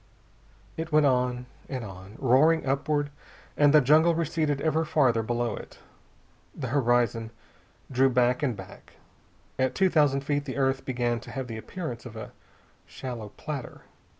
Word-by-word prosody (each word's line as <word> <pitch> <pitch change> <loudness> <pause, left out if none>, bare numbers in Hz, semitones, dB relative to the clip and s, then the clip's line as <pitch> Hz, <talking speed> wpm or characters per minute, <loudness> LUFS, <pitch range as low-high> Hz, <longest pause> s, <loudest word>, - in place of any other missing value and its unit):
It 160 0 -4
went 150 -1 +5
on 125 -2 +1 0.2
and 130 -3 -4
on, 95 +1 -11
roaring 145 +6 +4
upward, 145 +2 0 0.4
and 145 -1 +5
the 150 0 +7
jungle 155 +5 +5
receded 155 -3 0
ever 160 +1 +1
farther 130 -7 +2
below 120 +1 -1
it. - - -11 0.8
The 130 -5 -4
horizon 120 -3 +1 0.6
drew 135 +1 +4
back 125 0 +2
and 125 -7 -1
back. 95 -1 -12 0.7
At 130 0 +1
two 190 -1 +3
thousand 145 -3 +3
feet 145 0 -1
the 135 -1 -5
earth 135 -1 0
began 120 -2 -1
to - - -12
have 130 0 -4
the 115 -2 -6
appearance 125 -1 -6
of 115 - -11
a 110 - -7 0.6
shallow 120 -5 -7
platter. 145 -5 -6
130 Hz, 150 wpm, -27 LUFS, 120-150 Hz, 0.8 s, the